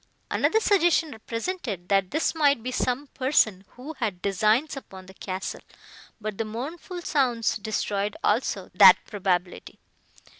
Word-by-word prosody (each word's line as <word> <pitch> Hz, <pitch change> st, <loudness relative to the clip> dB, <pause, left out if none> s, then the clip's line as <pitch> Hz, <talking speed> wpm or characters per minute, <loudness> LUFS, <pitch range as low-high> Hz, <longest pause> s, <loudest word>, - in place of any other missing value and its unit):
Another 445 Hz, -, +2 dB
suggestion 345 Hz, -7 st, +2 dB
represented, 230 Hz, -, -5 dB
that 195 Hz, -2 st, +2 dB
this 310 Hz, +3 st, 0 dB
might 285 Hz, -7 st, +2 dB
be 255 Hz, -, -3 dB
some 255 Hz, +2 st, -1 dB
person, 225 Hz, -8 st, +1 dB
who 270 Hz, +6 st, -8 dB
had 210 Hz, -7 st, -2 dB
designs 215 Hz, -, +1 dB
upon 190 Hz, -8 st, -10 dB
the 190 Hz, -, -14 dB
castle; 190 Hz, 0 st, -5 dB, 0.6 s
but 215 Hz, -2 st, -5 dB
the -, -, +1 dB
mournful 310 Hz, -, -6 dB
sounds 245 Hz, -8 st, +1 dB
destroyed, 210 Hz, +1 st, -2 dB
also, -, -, 0 dB
that -, -, +9 dB
probability. 185 Hz, -3 st, -2 dB
230 Hz, 135 wpm, -25 LUFS, 200-290 Hz, 0.6 s, that